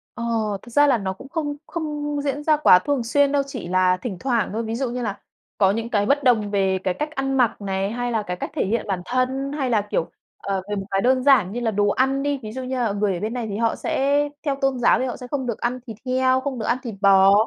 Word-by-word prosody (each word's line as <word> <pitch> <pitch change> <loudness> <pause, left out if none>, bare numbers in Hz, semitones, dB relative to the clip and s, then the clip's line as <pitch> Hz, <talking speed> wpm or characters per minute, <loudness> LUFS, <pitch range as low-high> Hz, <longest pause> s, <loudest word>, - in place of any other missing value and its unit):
Ờ, 235 - -5 0.4
thực - - -14
ra 290 +4 +5
là 270 - +4
nó 190 -3 -3
cũng 265 +8 -13
không 290 -1 -2
không 295 -3 -3
diễn 285 0 -2
ra 305 0 +3
quá 285 -11 +7
thường 285 -1 -1
xuyên 280 +4 +2
đâu, 285 -1 +2
chỉ 250 -10 -6
là 185 0 +3
thỉnh 190 0 -5
thoảng 240 -6 0
thôi. 225 +2 -2
Ví 225 0 -3
dụ 255 +1 -1
như 250 +1 -4
là 205 -4 -3 0.4
có 195 -1 +4
những 230 +3 -3
cái 205 -3 +1
bất 280 +5 +2
đồng 220 -6 +3
về 195 -2 +1
cái 185 - 0
cách 300 +10 -3
ăn 270 0 -1
mặc 240 -4 +2
này, 195 0 -2
hay 245 +1 -2
là 220 -2 0
cái 180 -3 -4
cách - - -5
thể - - +1
hiện 220 +4 -1
bản 190 -3 -2
thân 260 +3 -1
hay 275 -4 -1
là, 220 -3 +3
kiểu, 200 -5 -2 0.3
ờ, 195 -1 -3
về 205 - -1
một 195 -1 -4
cái 195 - +1
đơn 255 +2 +2
giản 250 -10 +5
như 235 - -3
là 230 -2 0
đồ 205 0 +1
ăn 265 +4 +1
đi, 285 -1 -1
ví 215 - -6
dụ 260 +3 -5
như, 255 +1 -3
ờ, 230 -4 0
người 205 -1 0
ở 175 - -4
bên 215 +4 -3
này 245 -3 -3
thì 200 - -3
họ 230 0 +1
sẽ 280 +2 +1 0.3
theo 280 -2 +1
tôn 270 -2 +1
giáo 240 - +4
thì 255 - 0
họ 250 - -4
sẽ 250 - -9
không 265 0 -3
được 235 - -3
ăn 245 +1 -1
thịt 220 -3 -7
heo, 255 0 +2
không 265 -2 -4
được 220 - -3
ăn 240 - +1
thịt 230 -5 -5
bò. 195 -1 +6
240 Hz, 285 wpm, -23 LUFS, 205-270 Hz, 0.4 s, quá